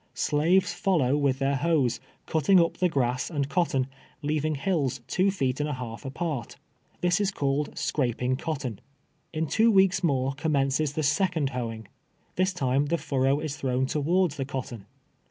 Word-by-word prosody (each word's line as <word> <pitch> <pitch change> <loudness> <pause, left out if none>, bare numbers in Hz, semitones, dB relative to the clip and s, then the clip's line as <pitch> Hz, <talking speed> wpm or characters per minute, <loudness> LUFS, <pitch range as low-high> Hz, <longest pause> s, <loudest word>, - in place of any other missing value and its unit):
Slaves 165 +6 +2
follow 160 - +2
with 140 -3 +1
their 135 0 +1
hoes, 145 -5 +1 0.3
cutting 160 +5 +3
uj) 170 -1 +3
the 180 - +2
grass 130 -4 0
and 145 -5 -1
cotton, 150 -5 +1 0.4
leaving 155 +1 0
hills 140 -5 -1
two 190 +8 +2
feet 135 -9 -1
and 150 +1 -1
a - - -2
halt' 125 0 -7
apart. 135 -2 -4 0.5
This 180 +3 +2
is 200 - +2
called 145 -5 -1
scraping 125 -2 0
cotton. 135 -7 -4 0.5
In 160 0 -1
two 220 +8 +3
weeks 190 -3 +4
more 135 -4 +1
commences 140 0 0
the 155 - -2
second 150 -1 +1
hoeing. 115 -4 -5 0.5
This 185 +1 +2
time 140 -4 0
the 170 - +1
furrow 135 -1 +1
is 150 -2 -4
thrown 130 -1 0
towards 155 +3 +1
the 135 - -2
cotton. 125 -6 -6
145 Hz, 160 wpm, -27 LUFS, 130-170 Hz, 0.5 s, weeks